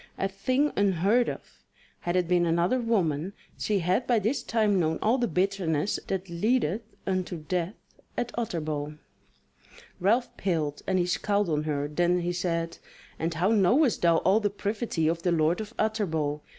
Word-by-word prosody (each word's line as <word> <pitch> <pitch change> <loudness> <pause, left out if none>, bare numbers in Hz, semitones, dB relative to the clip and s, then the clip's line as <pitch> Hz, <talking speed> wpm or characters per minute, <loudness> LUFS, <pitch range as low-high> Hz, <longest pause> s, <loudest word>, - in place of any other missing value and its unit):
A 195 - 0
thing 255 +10 0
unheard 200 +5 +2
of. - - -9 0.4
Had 175 0 -2
it 180 -2 +2
been 175 -1 +3
another 170 +9 +2
woman 190 -7 0 0.2
she 210 - 0
had 185 +7 0
by 240 - +3
this 230 +5 0
time 215 -5 +1
known 160 -1 +1
all 235 +5 +2
the 240 - +1
bitterness 185 -2 0
that 190 0 -2
leadeth 210 +2 0 0.2
unto 185 -2 -1
death 180 +3 -2 0.4
at 240 0 -1
Utterbol." 155 -9 -3 1.0
Ralph 230 +7 +1
paled 160 -6 -1
and 190 - +2
he 175 - +2
scowled 200 +2 0
on 150 -1 0
her, 145 -2 -1
then 175 +4 +1
he 175 +1 -1
said: 170 -2 -2 0.4
"And 165 0 -1
how 180 +5 +2
knowest 225 - +3
thou 170 -1 +4
all 190 +6 +3
the 210 -2 0
privity 205 -4 -2
of 165 +1 0
the 175 - +1
Lord 165 +4 +2
of 215 - -7
Utterbol? 160 -9 -1
185 Hz, 165 wpm, -27 LUFS, 165-215 Hz, 1.0 s, thou